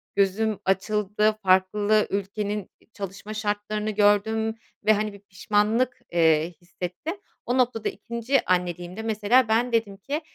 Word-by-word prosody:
gözüm 200 +2 +1
açıldı. 210 +2 +1
Farklı 205 +3 +3
ülkenin 205 0 -3
i - - -28
çalışma 200 +1 -7
şartlarını 210 0 -2
gördüm 215 +2 +2 0.3
ve 215 - +6
hani 210 0 -1
bir 200 - -12
pişmanlık, 210 +6 0
eee, 160 -1 +3
hissettim. 180 - -5 0.3
O 245 - 0
noktada 245 -3 +1
2'nci 235 +3 -1
anneliğimde, 180 +2 -1
mesela, 220 +3 +3
ben 230 +3 +2
dedim 220 -4 0
ki 285 - -3
210 Hz, 130 wpm, -25 LUFS, 195-220 Hz, 0.3 s, ve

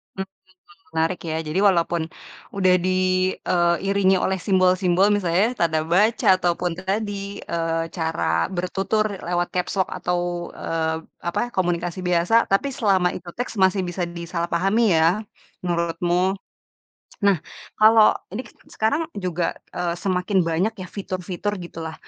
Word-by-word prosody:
Mmm, 190 - -2 0.5
wah 195 - -32
menarik, 165 +2 +1
ya. 160 - -2
Jadi 155 +5 -1
walaupun 170 -2 +2 0.5
udah 185 -2 +4
di - - +2 0.6
eee, 175 -1 +3
...iringi 195 -1 +3
oleh 190 0 +1
simbol-simbol, 185 0 +3
misalnya, 185 0 +2
tanda 160 -2 +2
baca, 215 +5 +3
atau 175 -1 +1
pun 180 0 0
tadi, 200 +1 -3
eee, 165 -1 -1
cara 160 -1 -2 0.3
bertutur 195 +4 0 0.2
lewat 175 0 0
caps 180 -1 -1
lock 185 - +1
atau, 180 0 -1 0.4
eee, 160 -1 -1 0.3
apa, 170 - 0
komunikasi 175 -1 -1
biasa, 175 +4 +2 0.2
tapi 195 +8 +2
selama 190 -6 +2
itu 175 -1 -8
teks, 245 - -3
masih 190 +1 +3
bisa 175 +1 -3
disalahpahami 170 +5 0 0.2
ya, 160 - +5 0.6
menurutmu? 175 +2 0 0.9
Nah, 200 -3 +4 0.4
kalau 220 0 +7 0.2
ini 245 - -3
kan - - -18 0.2
sekarang 225 +9 +1
juga, 180 -3 -2 0.2
eee, 170 -1 -1
semakin 185 +2 0
banyak 180 +7 +1
ya 185 - -6
fitur-fitur 190 +1 -4
gitu 170 - -10
lah, 160 - -6
180 Hz, 140 wpm, -23 LUFS, 170-195 Hz, 0.9 s, kalau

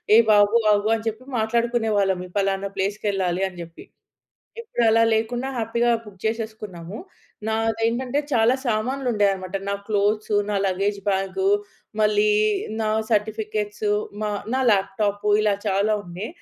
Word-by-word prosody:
ఏ - - +9
బాబు 205 +2 +5 0.2
ఆగు 205 +1 +1
అని 220 - -5
చెప్పి 225 +3 -3 0.2
మాట్లాడుకునేవాళ్ళం 220 -4 +1 0.2
పలానా 195 0 0
ప్లేస్‌కెళ్ళాలి 195 -2 -1
అని 180 - -13
చెప్పి. 165 0 -13 0.8
ఇప్పుడు 445 - -2
అలా 225 +1 +4
లేకుండా 240 +4 -1
హ్యాపీగా 235 +1 0 0.2
బుక్ 200 -2 -13
చేసేసుకున్నాము. 215 -5 -4 0.5
నాదేంటంటే 225 +4 0
చాలా 230 0 +4
సామాన్లు 250 +3 -1
ఉండేవి 205 -2 +3
అన్నమాట. 185 0 -6
నా 200 - 0
క్లోత్స్, 210 +1 0 0.2
నా 205 - 0
లగేజ్ 195 +2 0
బ్యాగ్, 190 -1 -1 0.6
మళ్ళీ 210 0 +3 0.5
నా 215 - 0 0.2
సర్టిఫికేట్స్, 210 0 -1 0.3
మా 210 -1 -1 0.2
నా 265 - +1
లాప్‌టాప్ 205 +1 0 0.2
ఇలా 210 -1 +2
చాలా 200 +2 +2
ఉండే. 180 +4 -6
210 Hz, 130 wpm, -23 LUFS, 195-225 Hz, 0.8 s, ఏ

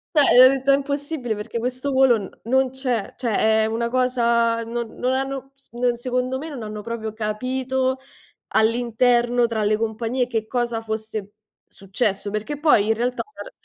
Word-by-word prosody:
cioè 270 -4 +8
ho - - +10
detto: 270 0 +1
"È - - +7
impossibile 280 -3 -3
perché 215 +3 -5
questo 255 +4 -2
volo 265 -2 +5
n 200 -3 -6
non 265 +3 +2
c'è". 250 -5 -3
Cioè 235 -4 -1
è 220 0 +3
una 230 +1 -1
cosa 235 -2 +1
non 230 0 -4
non 250 - -1
hanno 270 0 -3
s 275 - -16
ehm, 245 +1 +1
secondo 250 +2 -2
me 300 +4 -6
non 265 -7 -7
hanno 210 0 -6
proprio 220 0 -5
capito 255 +4 -1 0.5
all'interno 240 +1 +2
tra 225 -2 -2
le 210 +1 +2
compagnie 225 +3 -1
che 225 -3 -2
cosa 240 -1 -1
fosse 220 -2 -5 0.3
successo, 200 0 -2
perché 215 +8 -4
poi 290 -9 +4
in 225 - +3
realtà 245 +2 -1
c'era 425 +4 -11
240 Hz, 170 wpm, -22 LUFS, 220-260 Hz, 0.5 s, ho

